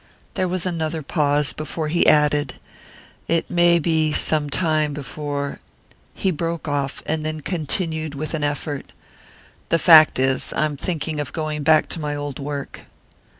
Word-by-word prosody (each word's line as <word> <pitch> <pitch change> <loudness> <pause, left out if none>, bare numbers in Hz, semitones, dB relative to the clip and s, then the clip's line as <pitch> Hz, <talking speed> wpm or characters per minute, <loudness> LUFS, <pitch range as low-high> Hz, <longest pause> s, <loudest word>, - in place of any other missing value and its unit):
There 185 - -1
was 180 0 -2
another 160 -3 -2
pause 145 -1 +2
before 155 +1 -4
he 170 +3 +2
added: 150 -1 +3 0.7
"It 165 0 0
may 175 -1 +4
be 160 -2 +1
some 150 -1 +2
time 155 -2 +1
before 145 0 -5 0.3
" - - -32
He 190 - 0
broke 165 0 -4
off, 140 -2 -2
and 155 0 -2
then 155 0 -4
continued 160 -1 -1
with 155 +3 -4
an 155 -2 -2
effort: 145 -1 -4 0.8
"The 165 - +3
fact 160 -2 +7
is, 130 0 0
I 155 - +1
am 150 -1 -3
thinking 155 0 -3
of 145 -2 -4
going 155 -2 -3
back 155 +1 +4
to - - -1
my 150 -1 -3
old 145 -2 -5
work." 140 0 -6
155 Hz, 160 wpm, -21 LUFS, 145-165 Hz, 0.8 s, fact